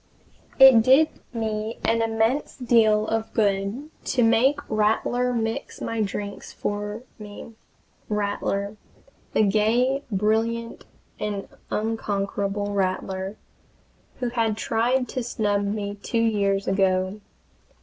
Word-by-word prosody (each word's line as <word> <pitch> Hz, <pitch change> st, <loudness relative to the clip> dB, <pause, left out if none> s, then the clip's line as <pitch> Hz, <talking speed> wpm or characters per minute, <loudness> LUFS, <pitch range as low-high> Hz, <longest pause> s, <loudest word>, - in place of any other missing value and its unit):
It 265 Hz, -4 st, +9 dB
did 270 Hz, +7 st, +5 dB, 0.2 s
me 220 Hz, -1 st, -3 dB
an 230 Hz, 0 st, +2 dB
immense 225 Hz, +5 st, 0 dB
deal 225 Hz, -4 st, +3 dB
of 225 Hz, 0 st, -2 dB
good 205 Hz, +7 st, 0 dB
to 250 Hz, -2 st, +1 dB
make 230 Hz, +5 st, +4 dB
Rattler 225 Hz, +3 st, +1 dB
mix 225 Hz, -1 st, -3 dB
my 230 Hz, -1 st, -2 dB
drinks 205 Hz, 0 st, -4 dB
for 205 Hz, +2 st, -4 dB, 0.2 s
me 210 Hz, +2 st, -10 dB, 0.6 s
Rattler! 205 Hz, 0 st, -2 dB, 0.6 s
the -, -, +4 dB
gay, 230 Hz, +6 st, +2 dB
brilliant, 225 Hz, +3 st, 0 dB, 0.3 s
and 205 Hz, -2 st, -3 dB, 0.2 s
unconquerable 205 Hz, -2 st, -2 dB
Rattler, 190 Hz, 0 st, -2 dB, 0.8 s
who 250 Hz, -2 st, -2 dB
had 225 Hz, -3 st, 0 dB
tried 245 Hz, +3 st, +1 dB
to 255 Hz, -, -3 dB
snub 205 Hz, -4 st, 0 dB
me 205 Hz, 0 st, -2 dB
two 230 Hz, -, -2 dB
years 200 Hz, -3 st, +1 dB
ago. 190 Hz, +1 st, +1 dB
215 Hz, 110 wpm, -24 LUFS, 205-230 Hz, 0.8 s, It